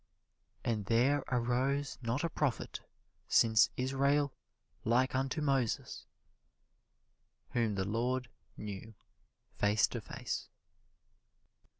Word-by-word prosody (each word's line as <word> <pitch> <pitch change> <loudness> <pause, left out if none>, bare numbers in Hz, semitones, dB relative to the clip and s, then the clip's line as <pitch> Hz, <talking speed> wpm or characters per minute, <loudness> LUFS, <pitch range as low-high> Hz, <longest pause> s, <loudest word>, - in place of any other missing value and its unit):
"And 110 -4 -1
there 130 +6 +3
arose 130 +3 0
not 120 +5 -1
a 170 - +1
prophet 145 -5 -1 0.5
since 110 -1 +5
Israel 140 +2 +2 0.5
like 125 +4 +2
unto 135 +3 0
Moses, 135 -5 0 1.4
whom 115 -4 +1
the 95 -1 0
Lord 125 +5 0 0.3
knew 105 +1 -7 0.6
face 105 +1 +4
to - - -4
face." - - -5
125 Hz, 90 wpm, -33 LUFS, 115-135 Hz, 1.4 s, since